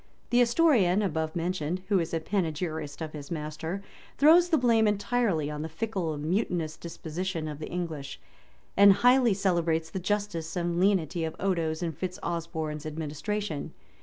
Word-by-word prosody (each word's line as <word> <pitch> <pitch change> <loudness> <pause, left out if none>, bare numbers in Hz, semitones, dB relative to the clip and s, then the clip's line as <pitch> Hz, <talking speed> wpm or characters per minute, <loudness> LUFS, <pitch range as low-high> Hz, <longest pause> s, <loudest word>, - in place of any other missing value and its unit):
The 240 - +4
historian 235 - +4
above 160 -3 -2
mentioned, 175 0 -2
who 200 -3 +4
is 165 -1 -2
a 165 - 0
panegyrist 160 -4 -2
of 155 - -6
his 145 -2 -8
master, 160 +4 -4 0.3
throws 335 +4 +6
the 320 - +4
blame 230 -4 +4
entirely 205 -7 0
on 150 0 -4
the 160 - -4
fickle 175 -2 -2
and 145 +1 -6
mutinous 170 -3 -1
disposition 170 0 -4
of 150 -1 -6
the 155 - -6
English, 160 -6 -5 0.6
and 200 0 +8
highly 245 0 +4
celebrates 170 -4 0
the 190 - -3
justice 190 -4 -2
and 175 -1 -1
lenity 180 -3 +2
of 160 0 -3
Odo's 170 -3 0
and 165 -3 -3
Fitz 180 +3 -4
Osborne's 160 -3 -3
administration. 160 +3 -4
170 Hz, 160 wpm, -28 LUFS, 160-200 Hz, 0.6 s, and